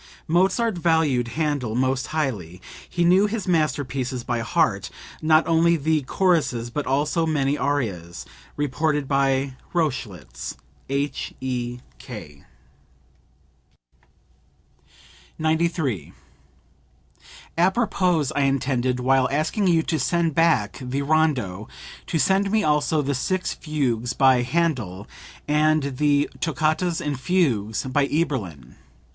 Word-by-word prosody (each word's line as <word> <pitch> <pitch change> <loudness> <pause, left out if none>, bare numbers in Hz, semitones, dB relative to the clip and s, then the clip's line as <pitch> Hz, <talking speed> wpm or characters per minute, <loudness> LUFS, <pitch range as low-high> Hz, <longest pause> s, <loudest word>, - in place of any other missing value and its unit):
(Mozart 190 +4 +2
valued 160 -8 +2
Handel 145 -8 -1
most 130 +1 0
highly. 110 - -3 0.3
He 175 -1 0
knew 185 +4 +5
his 210 -2 -4
masterpieces 135 -6 -1
by 120 -1 -2
heart 115 - 0 0.3
not 155 0 +4
only 170 +1 +4
the 155 +1 +1
choruses 140 -7 0
but 150 +3 -3
also 150 +5 +1
many 145 -2 +1
arias. 110 - -2 0.3
[Reported 145 +1 0
by 135 -1 +1 0.2
Rochlitz. 125 - -3 0.3
H.E.K.]) 125 - -5 2.9
93. 160 - -1 1.4
"Apropos, 185 -2 +2
I 145 - +2
intended, 130 -2 0
while 130 0 +3
asking 155 +8 0
you 165 -2 +3
to 160 -1 -1
send 165 +3 +1
back 160 -10 +2
the 130 +2 -2
rondo, 135 -10 0 0.4
to 165 - -1
send 195 +5 +2
me 215 +1 +2
also 150 0 +2
the 140 +1 -1
six 185 +8 -1
fugues 125 -7 -2
by 130 -2 +4
Handel 125 - -1 0.4
and 150 -2 +2
the 145 0 +3
toccatas 160 +2 0
and 145 -3 -3
fugues 125 - 0
by 140 +2 +1
Eberlin. 105 - -2
145 Hz, 105 wpm, -23 LUFS, 125-160 Hz, 2.9 s, knew